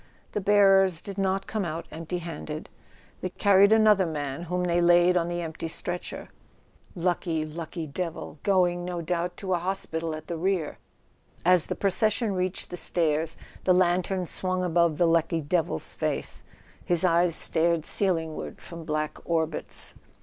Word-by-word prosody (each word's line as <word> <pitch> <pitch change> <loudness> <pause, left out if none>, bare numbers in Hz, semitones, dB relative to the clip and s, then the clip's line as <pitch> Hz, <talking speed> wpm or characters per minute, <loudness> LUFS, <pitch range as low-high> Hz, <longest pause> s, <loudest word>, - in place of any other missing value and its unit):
The 210 - -2
bearers 195 -3 +5
did 200 +1 -7
not 195 0 0
come 215 -2 -2
out 165 -1 -4
empty 165 +2 -4
handed; 160 -2 -6 0.5
they 185 - -2
carried 200 +2 +4
another 215 -4 +5
man 145 -2 -4
whom 180 +1 -1
they 175 -1 +2
laid 175 +1 +5
on 170 -1 +2
the 175 0 -3
empty 160 0 -5
stretcher. 175 +2 -5 0.7
Lucky, 170 -2 -1
lucky 160 +1 -6
devil; 160 0 -5
going, 180 -3 +2
no 175 -1 -4
doubt, 175 +1 -2
to 190 -2 -2
a 175 - +1
hospital 165 -3 -3
at 155 - -9
the 170 - -4
rear! 180 -2 -1 0.7
As 180 -2 +4
the - - -2
pro¬ 195 -2 0
cession 215 +1 +1
reached 185 0 -3
the 180 - -5
stairs 160 -2 0 0.3
the 185 - +4
lantern 180 +1 +1
swung 185 +2 0
above 170 -3 +2
the 175 - +4
lucky 165 0 +2
devil's 155 - -1
face: - - -3 0.4
his 175 +1 +3
eyes 170 -1 +3
stared 165 0 +2
ceilingward 165 -4 0
from 170 -1 -10
black 155 0 -2
orbits. 160 -2 -2
175 Hz, 155 wpm, -27 LUFS, 165-185 Hz, 0.7 s, bearers